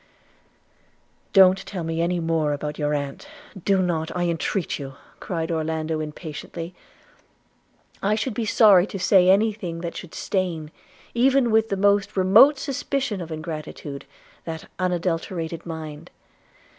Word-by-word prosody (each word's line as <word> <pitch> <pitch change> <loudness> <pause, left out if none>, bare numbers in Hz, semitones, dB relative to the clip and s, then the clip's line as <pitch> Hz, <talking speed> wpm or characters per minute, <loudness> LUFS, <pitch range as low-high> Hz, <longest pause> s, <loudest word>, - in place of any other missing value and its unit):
'Don't 190 -1 +6
tell 185 -4 -5
me 165 0 -2
any 175 +1 0
more 165 -3 0
about 150 +1 -5
your 150 0 0
aunt, 140 - -5 0.4
do 195 -2 +3
not, 165 -2 -1
I 175 - 0
entreat 170 +1 -1
you,' 135 -1 -7 0.2
cried 165 -2 -3
Orlando 160 0 -1
impatiently. 160 +2 -7 1.3
'I 205 +2 +2
should 225 +3 -2
be 230 - -2
sorry 200 -4 +6
to 195 - -6
say 185 -1 +4
any 210 +3 +4
thing 175 -5 -6
that 170 -1 -5
should 180 - -8
stain, 170 -6 -2 0.4
even 255 0 +3
with 220 0 +3
the 195 - -1
most 200 0 +2
remote 215 +10 +6
suspicion 270 - -2
of 170 -1 -7
ingratitude, 155 -3 -6 0.4
that 160 -1 -6
unadulterated 170 -2 -2
mind. 155 -2 -7
175 Hz, 135 wpm, -24 LUFS, 160-200 Hz, 1.3 s, Don't